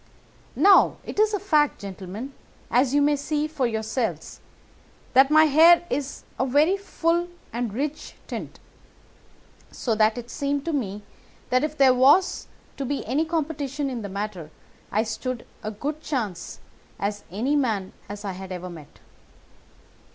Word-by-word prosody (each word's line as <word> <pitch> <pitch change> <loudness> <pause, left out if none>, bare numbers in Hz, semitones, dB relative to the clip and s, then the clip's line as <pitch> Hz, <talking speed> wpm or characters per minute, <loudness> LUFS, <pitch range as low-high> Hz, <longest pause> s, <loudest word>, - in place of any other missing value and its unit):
"Now, 395 -1 +6
it - - -6
is 430 0 +4
a 410 - -1
fact, 305 -7 +2
gentlemen, 200 +6 -7 0.4
as 250 +2 +3
you 285 +1 +3
may 295 0 +3
see 295 +1 -1
for 295 -5 -1
yourselves, 220 +1 -3 0.7
that 265 +1 +6
my 310 +1 +7
hair 330 +4 +6
is 285 -1 -3 0.2
of 260 - +1
a - - -7
very 310 +7 +5
full 345 -3 0 0.3
and 240 -1 -2
rich 285 +7 -4
tint, - - -7 1.1
so 235 - -1
that 215 +1 +3
it 240 0 -7
seemed 280 -1 -2
to 335 - -1
me 210 -7 -3 0.5
that 255 +2 +3
if 305 0 -2
there 265 -2 +6
was 280 +9 +4 0.3
to 275 - -3
be 280 +1 -3
any 280 +8 +1
competition 295 -4 -2
in 240 -3 -4
the 200 - -6
matter 195 -5 -5 0.4
I 215 +2 +2
stood 235 +2 -4 0.2
as 215 0 -5
good 295 +2 -2
a - - -24
chance 235 - -4 0.4
as 205 +1 -3
any 240 +10 0
man 220 -9 0
that 205 +1 -7
I 195 - -2
had 190 0 -8
ever 180 0 -6
met. 155 -4 -13
265 Hz, 160 wpm, -25 LUFS, 215-300 Hz, 1.1 s, my